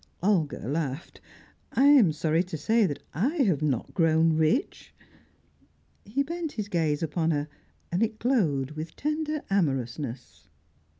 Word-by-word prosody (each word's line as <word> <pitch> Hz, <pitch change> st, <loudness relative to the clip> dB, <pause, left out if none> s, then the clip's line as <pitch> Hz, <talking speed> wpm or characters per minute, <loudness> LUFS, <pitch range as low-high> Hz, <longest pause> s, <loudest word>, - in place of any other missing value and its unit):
Olga 175 Hz, -, +1 dB
laughed. 145 Hz, +1 st, -4 dB, 0.5 s
"I 270 Hz, -, +4 dB
am 275 Hz, -, +7 dB
sorry 155 Hz, +2 st, +1 dB
to 170 Hz, -3 st, -6 dB
say 220 Hz, +7 st, +2 dB
that 145 Hz, -, -6 dB
I 245 Hz, -, 0 dB
have 175 Hz, -, +1 dB
not 140 Hz, -6 st, -1 dB
grown 165 Hz, -1 st, +3 dB
rich." 160 Hz, -, 0 dB, 1.1 s
He 255 Hz, +8 st, 0 dB
bent 335 Hz, +1 st, -4 dB
his 210 Hz, -2 st, -4 dB
gaze 160 Hz, -4 st, 0 dB
upon 160 Hz, +1 st, 0 dB
her, 145 Hz, -2 st, 0 dB, 0.4 s
and 175 Hz, +4 st, 0 dB
it 225 Hz, -1 st, 0 dB
glowed 165 Hz, -, +1 dB
with 155 Hz, +1 st, -7 dB
tender 305 Hz, 0 st, -2 dB
amorousness. 125 Hz, -, -2 dB
165 Hz, 135 wpm, -27 LUFS, 150-225 Hz, 1.1 s, am